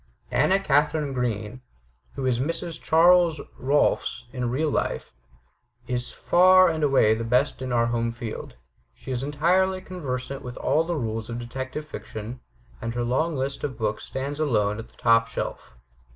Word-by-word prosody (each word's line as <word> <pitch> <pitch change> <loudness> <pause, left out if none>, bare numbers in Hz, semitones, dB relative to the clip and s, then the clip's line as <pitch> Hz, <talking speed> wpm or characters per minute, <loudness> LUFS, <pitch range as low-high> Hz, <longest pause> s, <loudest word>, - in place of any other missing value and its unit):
Anna 190 +1 +3
Katharine 150 -3 +1
Green, 120 -1 -3 0.5
who 135 - -3
is 125 -2 +1
Mrs. 165 +3 -3
Charles 170 -1 +5 0.2
Rohlfs 140 -2 +1
in 125 -2 -2
real 150 +5 0
life, - - -2 0.7
is 125 0 -2
far 185 +1 +5
and 160 -2 -2
away 135 -6 +4
the 115 +1 -2
best 125 +3 +1
in 130 -1 -3
our 120 -1 +3
home 115 0 0
field. 115 -1 -7 0.4
She 135 - -8
is 125 -1 -1
entirely 175 +7 +2
conversant 140 -8 -5
with 125 0 -8
all 160 - +2
the 175 0 -2
rules 115 -5 -3
of 115 - -4
detective 130 +5 -5
fiction, 115 -4 -7 0.4
and 115 +1 -4
her 120 - 0
long 150 +7 0
list 135 +1 -3
of 130 -5 -3
books 110 -2 -2
stands 140 +3 -4
alone 105 -8 +1
on 115 - -8
the - - -27
top 115 -1 +4
shelf. 115 - -5
130 Hz, 165 wpm, -25 LUFS, 120-155 Hz, 0.7 s, Charles